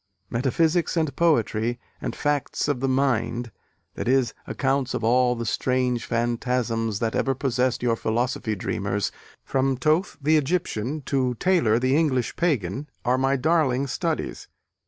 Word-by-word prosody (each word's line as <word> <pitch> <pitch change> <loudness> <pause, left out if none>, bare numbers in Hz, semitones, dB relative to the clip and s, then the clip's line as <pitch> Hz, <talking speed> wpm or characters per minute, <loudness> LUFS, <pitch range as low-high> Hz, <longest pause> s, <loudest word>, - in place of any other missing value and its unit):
Metaphysics 160 +8 +1
and 155 -5 0
poetry 120 -7 +1 0.2
and - - -3
'facts 145 -1 -1
of 145 -4 0
the 135 - 0
mind' 125 -3 0 0.4
(i.e., 130 +2 +2 0.2
accounts 135 -1 0
of - - -3
all 125 +2 +3
the 115 0 -4
strange 125 0 0
phantasms 115 -2 -1
that 115 +1 -1
ever 135 -1 +1
possessed 125 -1 0
your 120 -2 +2
philosophy 115 0 -1
dreamers, 100 +1 -2 0.3
from 135 0 +1
Thoth, 155 +8 +1
the 155 +2 +3
Egyptian, 150 -3 -1
to 130 -2 0
Taylor, 160 -8 +3
the 130 +2 +2
English 135 -7 +1
pagan) 140 - -1 0.2
are 125 +1 +2
my 135 +1 +2
darling 140 -2 +2
studies. 135 - -3
130 Hz, 135 wpm, -24 LUFS, 120-140 Hz, 0.4 s, all